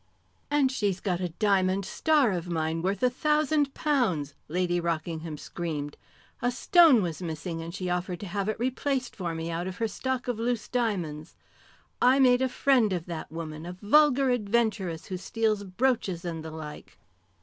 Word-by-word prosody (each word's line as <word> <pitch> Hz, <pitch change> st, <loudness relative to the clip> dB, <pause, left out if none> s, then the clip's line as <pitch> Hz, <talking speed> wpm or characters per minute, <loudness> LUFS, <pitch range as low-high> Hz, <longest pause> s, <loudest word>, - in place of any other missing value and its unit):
"And 290 Hz, -3 st, +3 dB
she's 200 Hz, -7 st, -1 dB
got 180 Hz, -4 st, -1 dB
a 180 Hz, -, -1 dB
diamond 190 Hz, +1 st, +1 dB
star 295 Hz, -4 st, +2 dB
of 175 Hz, -1 st, -3 dB
mine 160 Hz, -1 st, -1 dB
worth 195 Hz, +7 st, -1 dB
a 250 Hz, -, +5 dB
thousand 300 Hz, 0 st, +1 dB
pounds!" 215 Hz, -, 0 dB
Lady 175 Hz, +1 st, 0 dB
Rockingham 165 Hz, -2 st, -3 dB
screamed. 150 Hz, -3 st, -5 dB, 0.5 s
"A 245 Hz, -, +2 dB
stone 275 Hz, -, +5 dB
was 170 Hz, -1 st, -4 dB
missing, 165 Hz, 0 st, -4 dB
and 165 Hz, +1 st, -6 dB
she 185 Hz, +1 st, -4 dB
offered 180 Hz, 0 st, -2 dB
to -, -, -5 dB
have 200 Hz, +2 st, -2 dB
it 215 Hz, -, -2 dB
replaced 260 Hz, +1 st, -1 dB
for 170 Hz, -3 st, -3 dB
me 165 Hz, +1 st, -4 dB
out 170 Hz, +2 st, -3 dB
of 185 Hz, 0 st, -6 dB
her 230 Hz, -, 0 dB
stock 260 Hz, +4 st, -3 dB
of 245 Hz, -3 st, -2 dB
loose 235 Hz, -1 st, -1 dB
diamonds. 175 Hz, -10 st, -2 dB, 0.7 s
I 255 Hz, +2 st, +6 dB
made 255 Hz, -2 st, +5 dB
a 260 Hz, -, +2 dB
friend 250 Hz, -5 st, +3 dB
of 175 Hz, -2 st, -3 dB
that 170 Hz, -4 st, -6 dB
woman, 160 Hz, -1 st, -6 dB
a 175 Hz, +1 st, -6 dB
vulgar 270 Hz, +6 st, +4 dB
adventuress, 210 Hz, -7 st, 0 dB
who 185 Hz, -, -4 dB
steals 215 Hz, +2 st, 0 dB
brooches 195 Hz, -3 st, -1 dB
and 165 Hz, -2 st, -4 dB
the 160 Hz, -, -6 dB
like." 155 Hz, -1 st, -9 dB
195 Hz, 175 wpm, -28 LUFS, 170-245 Hz, 0.7 s, I